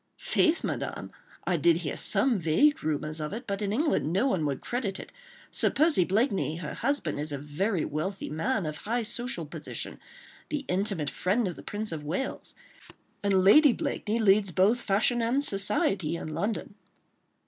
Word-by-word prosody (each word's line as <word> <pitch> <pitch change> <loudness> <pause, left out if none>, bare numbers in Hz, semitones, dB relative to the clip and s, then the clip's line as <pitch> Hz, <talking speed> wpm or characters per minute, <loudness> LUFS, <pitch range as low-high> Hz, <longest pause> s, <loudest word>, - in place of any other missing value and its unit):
"Faith, 335 0 +1
Madame, - - -4 0.3
I 180 - +1
did 165 +2 +4
hear 165 -4 -4
some 220 +2 +2
vague 175 - +3
rumours 155 +1 -1
of 150 +3 -4
it, 235 +4 -6
but 200 -1 -3
in 200 -1 -1
England 275 - +1
no 195 +8 +2
one 180 - +1
would 140 -2 -2
credit 235 -6 -3
it.... - - -10 0.4
Sir - - +2
Percy 300 - +3
Blakeney, 195 - +1
her 165 -2 -6
husband, 270 - -1
is 150 +1 -1
a 145 - -3
very 155 +6 -1
wealthy 185 +7 -3
man, 185 - -1
of 155 -1 -4
high 235 +6 -2
social 235 -5 -2
position, 150 +1 -6 0.5
the 295 -2 -3
intimate 185 -6 -1
friend 205 +4 0
of 175 - -4
the - - -10
Prince 210 0 -5
of 155 -2 -5
Wales... 175 - -4 0.7
and 195 -2 +2
Lady 280 +7 +7
Blakeney 220 0 -2
leads 205 -2 +4
both 195 +7 +3
fashion 225 +4 +2
and 245 +5 +1
society 195 - +1
in 165 - -5
London." 205 +6 -3
195 Hz, 170 wpm, -28 LUFS, 160-235 Hz, 0.7 s, Lady